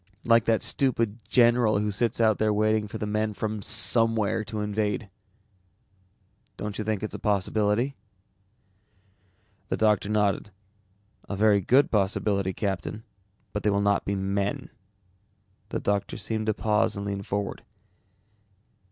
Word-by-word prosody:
Like 115 -1 +4
that 115 -1 +1
stupid 115 -5 0
general 120 -3 +4
who 105 0 -1
sits 115 +3 -1
out 110 -2 +3
there 110 0 +2
waiting 110 0 +1
for - - -6
the - - -3
men 105 0 -1
from 110 0 -3
somewhere 115 -1 +3
to 105 +1 -4
invade?" 105 0 -2 1.5
"Don't 105 0 -5
you - - -1
think 110 -1 -2
it's 110 - -4
a - - -5
possibility?" 105 +5 0 1.7
The - - -1
doctor 105 -2 +2
nodded. 105 -2 0 0.8
"A 100 - -2
very 105 0 +3
good 130 +9 +3
possibility, 100 -1 +1
Captain, 100 +3 -4 0.5
but 105 - -2
they 105 - +1
will 100 0 +1
not 100 0 +1
be 100 - -2
men." 100 +1 -2 1.0
The - - -2
doctor 100 -1 -1
seemed 110 -1 -3
to 110 - +2
pause 110 -1 +1
and 100 - -4
lean 100 -1 -3
forward. 100 0 -4
105 Hz, 140 wpm, -26 LUFS, 100-110 Hz, 1.7 s, Like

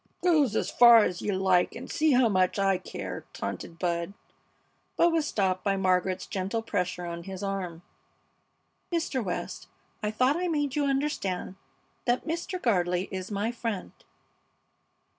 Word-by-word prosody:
"Go 320 -6 +4
's 220 - -1
far 235 -2 +8
's 180 0 -3
you 205 - -1
like 185 -1 +2
and 240 - -7
see 310 -2 +2
how 250 -1 +5
much 185 -3 +2
I 195 -2 +2
care!" - - -6
taunted 165 - -5
Bud, 170 +1 -1 0.8
but 340 - +5
was 320 -2 +1
stopped 185 -3 0
by 195 -1 +1
Margaret's 185 -1 +1
gentle 195 +4 -2
pressure 180 -4 -2
on 170 0 -6
his 190 0 -6
arm. 185 -4 -4 1.1
"Mr. 320 -7 -1
West, 180 -3 -4 0.3
I 210 - 0
thought 255 +7 +2
I 360 +1 -1
made 290 -4 -1
you 295 -1 +1
understand 270 -11 -1 0.5
that 245 0 +1
Mr. 340 +3 -3
Gardley 180 - +1
is 190 0 -5
my 210 +2 -1
friend." 230 -5 -4
200 Hz, 150 wpm, -28 LUFS, 185-260 Hz, 1.1 s, far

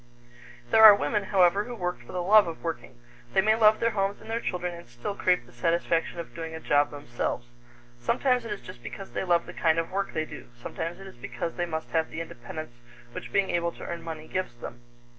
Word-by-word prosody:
There 220 - +7
are 215 -2 +12
women, 205 0 0
however, 195 +1 +4
who 245 - -6
work 180 - -3
for - - -12
the 180 -1 -2
love 210 +1 +7
of 165 - -7
working. 165 -7 -5 0.4
They 190 - +6
may 215 +2 +4
love 215 -1 +5
their 230 0 +2
homes 200 -1 -1
and 225 - -9
their 230 - 0
children 180 -4 -2
and 170 -4 -11
still 120 +10 -5
crave 180 -9 +1
the 120 - -18
satisfaction 165 +6 0
of 170 - -7
doing 165 -1 -6
a - - -5
job 145 -2 +3
themselves. 120 -3 -3 0.5
Sometimes 250 - +1
it 225 - -6
is 205 - -4
just 185 -10 -11
because 190 - -8
they - - -2
love 175 -2 +2
the - - -9
kind 160 -1 +2
of 165 +1 -1
work 195 +1 -1
they 155 0 -1
do; 150 - -10
sometimes 165 +8 -5
it 195 - -10
is 190 - -12
because 165 +7 -4
they 175 -1 -2
must 160 -1 -4
have 160 -1 +1
the - - -6
independence 155 -2 -7 0.4
which - - -7
being 195 -1 +2
able 170 0 0
to - - -10
earn 170 -1 -5
money 160 -1 -7
gives 185 -10 -3
them. 120 0 -9
170 Hz, 235 wpm, -27 LUFS, 160-200 Hz, 0.5 s, are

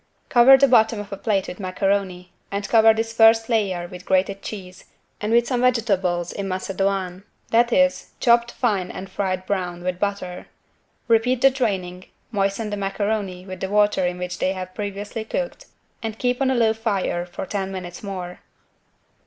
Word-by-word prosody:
Cover 255 +2 +8
the 275 +1 +5
bottom 225 -3 +4
of 205 -1 -7
a - - -2
plate 200 -1 -1
with 180 - -8
macaroni 185 -1 -2 0.2
and 200 0 -3
cover 225 -1 +6
this 225 +1 -2
first 225 0 +5
layer 195 -6 0
with 180 0 -10
grated 195 +1 +1
cheese 185 -3 -8 0.4
and 210 +1 -2
with 235 +1 +4
some 245 -1 -1
vegetables 195 -8 +1
in 200 -1 -4
macédoine, 190 -1 -2 0.3
that 235 +1 +4
is, 275 +2 +2
chopped 235 -1 +3
fine 200 -7 -1
and 190 +1 -8
fried 185 -2 -2
brown 180 -3 -3
with 180 0 -2
butter. 200 -3 -3 0.6
Repeat 235 +2 +2
the 270 - +6
draining, 190 -8 -2 0.3
moisten 200 +1 -1
the 205 - -2
macaroni 195 -2 -2
with 185 -1 -8
the 190 - -3
water 205 -1 +3
in 180 0 -3
which 180 0 -5
they 190 - +1
have 185 -1 -7
previously 205 +2 -5
cooked - - -4 0.3
and 220 -1 -4
keep 250 +2 -1
on 265 - +3
a 265 - +1
low 225 -2 +3
fire 205 -6 -1
for 175 +1 -7
ten 195 0 -3
minutes 180 -2 -7
more. 185 -3 -6
200 Hz, 175 wpm, -22 LUFS, 185-225 Hz, 0.6 s, Cover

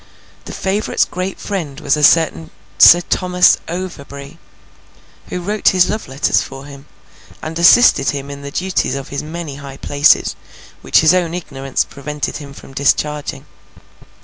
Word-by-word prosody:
The - - -8
favourite's 195 +3 -1
great 185 +2 -5
friend 160 -9 -5
was 140 -3 +1
a 150 - -3
certain 145 - +3 0.3
Sir 175 - +8
Thomas 180 0 +2
Overbury, 140 -6 -8 0.9
who 180 - -5
wrote 205 +4 -2
his 185 -2 +4
love 215 +1 -5
letters 135 +2 0
for 135 0 -9
him, 140 0 -13 0.5
and 160 +1 -6
assisted 170 - +5
him 140 -1 -5
in 140 0 -9
the 140 - -7
duties 180 0 -2
of 135 -1 -7
his 140 - -4
many 155 -2 -7
high 140 -1 -10
places, 145 +2 +2 0.5
which - - +3
his 160 +2 +4
own 175 -2 0
ignorance 135 -6 -3
prevented 150 0 -5
him 145 -2 -10
from 135 - -14
discharging. 145 - -1
150 Hz, 150 wpm, -17 LUFS, 140-180 Hz, 0.9 s, Sir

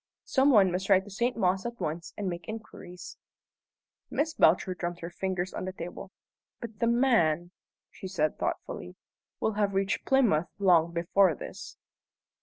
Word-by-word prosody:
Some 270 +1 +3
one 200 -8 +5
must 190 +2 -3
ride 190 -1 +5
to 205 - -12
St. 240 +5 -1
Mawes 190 -2 +1
at 235 0 -6
once 160 +2 -4
and 205 - -3
make 175 -2 -5
inquiries." 215 -5 -9 0.9
Miss 315 +2 -1
Belcher 185 - +3
drummed 175 -1 -4
her 170 +1 -6
fingers 185 0 -3
on - - -4
the 185 - -4
table. 180 +2 -8 0.5
"But 225 -3 -8
the 230 - +2
man," 180 - +2 0.4
she 190 - -8
said 155 -5 -1
thoughtfully, 90 - -4 0.4
"will 220 - +1
have 205 -2 0
reached 195 0 0
Plymouth 215 - +3
long 175 -4 +4
before 170 +1 +3
this." - - -9
190 Hz, 160 wpm, -29 LUFS, 175-215 Hz, 0.9 s, one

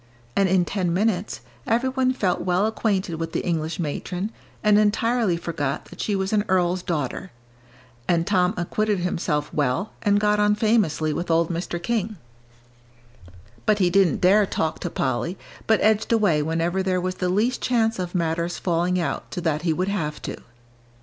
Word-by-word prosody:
And 195 -1 +3
in 180 -1 +3
ten 185 -3 -1
minutes, 200 +1 0 0.3
every 240 +3 +2
one 260 -1 +1
felt 195 -8 0
well 180 +2 +1
acquainted 195 -6 -1
with 165 0 -4
the - - -2
English 160 -2 -2
matron, 180 +5 -3 0.3
and 210 -1 +5
entirely 215 -2 +2
forgot 150 -5 -3
that - - -9
she 205 - 0
was 190 +1 -1
an 210 -1 +3
earl's 180 -1 +1
daughter. 155 -8 -3 0.8
And 170 -1 +2
Tom 185 0 +2
acquitted 205 +3 0
himself 160 -4 -1
well, 145 +7 0
and 205 0 +3
got 210 0 +2
on 210 0 +3
famously 210 -9 +1
with 170 +2 -4
old 165 +1 +2
Mr. 175 0 -3
King. 215 +2 -2 1.5
But 210 - +4
he 180 -3 +2
didn't 195 -2 +3
dare 200 +3 +5
talk 160 -2 -2
to 175 - -3
Polly, 160 +7 -2 0.3
but 220 -1 +4
edged 215 +1 +2
away 205 -10 +3
whenever 165 +4 0
there 185 -1 0
was 185 +1 -2
the 180 - +1
least 215 +7 +1
chance 225 -4 +1
of 180 0 -4
matters 170 0 -1
falling 180 +1 0
out 170 - -3
so - - -4
that 155 -2 0
he 170 -1 +1
would 180 +4 -1
have 155 -7 -2
to. - - -5
180 Hz, 175 wpm, -24 LUFS, 170-210 Hz, 1.5 s, and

